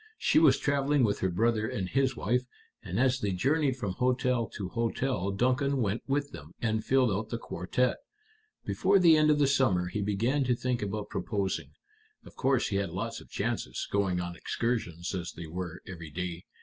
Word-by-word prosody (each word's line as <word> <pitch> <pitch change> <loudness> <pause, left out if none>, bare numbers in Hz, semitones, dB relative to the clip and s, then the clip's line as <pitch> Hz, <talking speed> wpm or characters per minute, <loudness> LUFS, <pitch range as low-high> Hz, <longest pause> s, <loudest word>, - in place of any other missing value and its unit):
She - - +3
was 155 -4 +6
traveling 140 0 +2
with 105 -2 +1
her 95 - +1
brother 110 +4 +1
and 95 -4 -3
his 135 +4 +1
wife, 120 +4 +1 0.4
and - - -3
as 130 0 +3
they 100 -6 -1
journeyed 135 - +1
from 105 -7 -2
hotel 125 +1 +1
to 95 -4 -6
hotel 115 -3 -1
Duncan 130 +7 +1
went 110 -1 0
with 145 +1 0
them, 75 +3 -11
and 110 -2 0
filled 130 -1 +3
out 105 +3 -2
the 115 - -2
quartette. 115 +4 -1 0.7
Before 195 +1 +3
the 170 -4 +7
end 155 0 +4
of 150 - +4
the 145 - +4
summer 120 -11 +2
he 105 - -3
began 115 +8 +1
to 125 -1 +2
think 125 0 -1
about 105 0 -3
proposing. 100 -3 -2 0.5
Of - - -14
course 135 -2 +1
he 100 - 0
had 100 -2 -1
lots 90 +3 -4
of - - -16
chances, - - -3
going 95 -3 +1
on 90 -1 -4
excursions 90 -7 -2
as 90 -2 -4
they 85 - -8
were 90 +1 -6
every 85 -4 -8
day. 90 +2 -5
115 Hz, 190 wpm, -29 LUFS, 95-130 Hz, 0.7 s, the